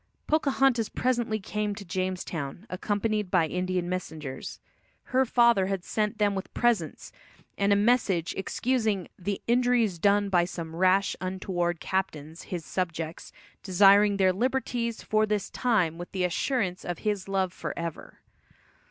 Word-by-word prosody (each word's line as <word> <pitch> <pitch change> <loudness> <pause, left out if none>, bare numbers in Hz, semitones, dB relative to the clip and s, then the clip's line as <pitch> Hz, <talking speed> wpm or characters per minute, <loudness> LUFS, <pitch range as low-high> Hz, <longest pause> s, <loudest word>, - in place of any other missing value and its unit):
Pocahontas 270 -6 +2
presently 240 -3 0
came 210 +1 -3
to 200 -1 -9
Jamestown, 180 -2 -4
accompanied 205 +2 -1
by 180 -3 +3
Indian 180 +1 -1
messengers. 160 -6 -5 0.4
Her 260 0 +1
father 235 -6 +4
had 195 -2 -2
sent 215 +2 -1
them 205 -1 +2
with 190 -1 -5
presents, 240 -2 0 0.4
and 200 0 +1
a - - +6
message 205 -6 +2
excusing 220 -2 -1
"the 195 +2 -3
injuries 240 -6 +2
done 205 +2 +3
by 175 -2 +3
some 165 -2 -6
rash, 185 +3 +3
untoward 185 -2 -2
captains, 160 -4 -3
his 175 -4 -5
subjects, 165 -3 -4 0.3
desiring 200 +2 +5
their 190 -1 +4
liberties 240 +1 -1
for 215 0 +2
this 210 -2 -1
time 185 -10 +1
with 175 - -7
the 185 -2 -1
assurance 185 +1 -1
of 175 -1 -4
his 205 -3 -1
love 190 -2 0
forever." 170 -3 -6
195 Hz, 135 wpm, -27 LUFS, 180-220 Hz, 0.4 s, a